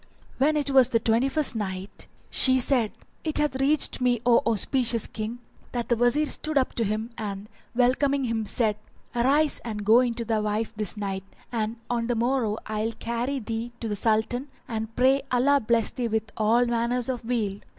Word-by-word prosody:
When 300 +3 +3
it 285 -2 -1
was 260 -2 +5
the 230 - +2
Twenty 230 +4 +2
first 300 -3 +2
Night, 190 -2 -5 0.2
She 260 -1 +5
said, 245 -4 +3 0.3
It 310 -2 +3
hath 300 -3 +1
reached 285 -1 +1
me, 245 -2 +2
O 240 -1 +6
auspicious 230 +1 +1
King, 220 +2 -5 0.4
that 240 -1 -3
the 240 - +3
Wazir 245 +6 +2
stood 310 0 0
up 260 - +1
to 230 - 0
him 215 +3 -2
and 200 -1 -5 0.3
welcoming 270 +3 +2
him 225 -3 -2
said, 215 -2 +1 0.4
"Arise 280 +6 +2
and 210 -3 -5
go 225 +3 +6
in 245 -2 0
to 235 -1 -3
thy 220 -1 0
wife 210 +1 -2
this 210 -1 -3
night, 195 -2 -3 0.3
and 225 -1 -2
on 235 -1 -1
the 240 - 0
morrow 235 -2 0
I 215 0 -2
will 225 - -2
carry 235 +5 -3
thee 230 0 -4
to 230 - -4
the 210 - -2
Sultan, 225 +5 0 0.2
and 225 -1 -5
pray 265 +2 +3
Allah 275 +3 +3
bless 230 -2 +1
thee 245 -2 -2
with 220 0 -2
all 225 +3 +3
manner 235 +1 0
of 250 -3 -3
weal." 220 -4 -2
235 Hz, 190 wpm, -26 LUFS, 220-255 Hz, 0.4 s, O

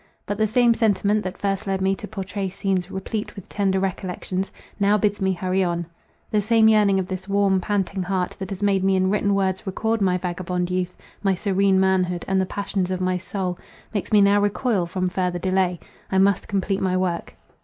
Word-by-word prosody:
But 205 +1 -3
the 215 - +3
same 235 +2 +4
sentiment 210 -2 +2
that 185 +1 -5
first 200 +1 -2
led 195 0 0
me 190 0 +2
to 210 - -7
pourtray 195 -1 -4
scenes 190 -1 -1
replete 195 +3 -4
with 195 - -10
tender 195 -2 0
recollections, 190 0 -3 0.3
now 205 +1 +4
bids 205 0 0
me 190 0 +2
hurry 185 +1 0
on. 175 -1 -1 0.5
The 210 - +2
same 220 +1 +4
yearning 210 -3 +4
of 190 - 0
this 185 0 -5
warm, 195 -1 +2
panting 195 0 -1
heart, 185 0 -1
that 190 -1 -5
has 195 0 -5
made 195 -2 +2
me 195 0 +3
in 185 0 +2
written 200 -1 +2
words 190 0 -1
record 220 +3 -1
my 185 -2 +3
vagabond 180 0 -3
youth, 180 0 -2 0.2
my 195 -2 +2
serene 195 0 +2
manhood, 185 -2 +1
and 190 0 +2
the 190 - -1
passions 200 -2 -2
of 185 -1 -2
my 185 0 0
soul, 185 -1 -3 0.3
makes 205 - -3
me 210 -1 +6
now 200 +1 +5
recoil 205 -2 +1
from 185 +1 -1
further 180 -1 -1
delay. 185 -1 0 0.3
I 190 - +2
must 195 0 +3
complete 195 0 -1
my 185 -1 +1
work. 180 -2 -2
190 Hz, 205 wpm, -23 LUFS, 185-200 Hz, 0.5 s, me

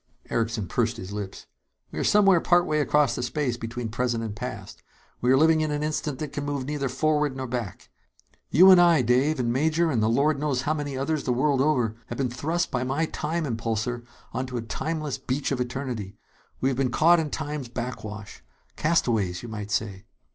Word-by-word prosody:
Erickson 115 -3 -1
pursed 120 +2 0
his 95 +1 -7
lips. 100 -2 -6 0.5
"We - - -5
are - - 0
somewhere 195 -4 +5
partway 175 -3 +3
across 150 -3 +3
the 120 - -3
space 125 0 -1
between 115 0 -5
present 120 0 -1
and 110 -2 -5
past. - - -7 0.4
We 125 - +3
are 130 - +6
living 160 +2 +4
in 155 - 0
an 150 0 -2
instant 150 -2 -2
that 150 +1 -5
can 145 - -3
move 145 -2 -3
neither 140 -1 -2
forward 150 +1 0
nor 130 - -3
back. 120 -6 -5 0.6
You 185 +4 +8
and 180 -1 +8
I, 170 -6 +5
Dave, 130 +6 +2
and 120 -1 0
Major 160 +4 +2
and 120 -5 +1
the 110 - +2
Lord 140 +5 +2
knows 140 -4 -1
how 155 - +1
many 145 -3 -4
others 145 +3 -1
the - - +1
world 135 +2 +2
over 125 -7 +1
have 120 - -6
been 130 -3 -1
thrust 160 +7 -1
by 125 -1 -1
my 135 +6 0
time 160 +1 -3
impulsor 115 -1 -2 0.3
onto 130 -1 -3
a 115 - -3
timeless 155 +4 -3
beach 135 +3 -2
of 130 -2 0
eternity. 125 -6 -4 0.4
We 130 - +2
have 130 - -2
been 135 -2 +1
caught 165 +7 +5
in 155 -2 -2
time's 150 -3 -4
backwash. 110 -4 -6 0.3
Castaways, 115 - +1
you 120 - -7
might 105 -2 -6
say." 105 -1 -2
130 Hz, 200 wpm, -26 LUFS, 120-150 Hz, 0.6 s, You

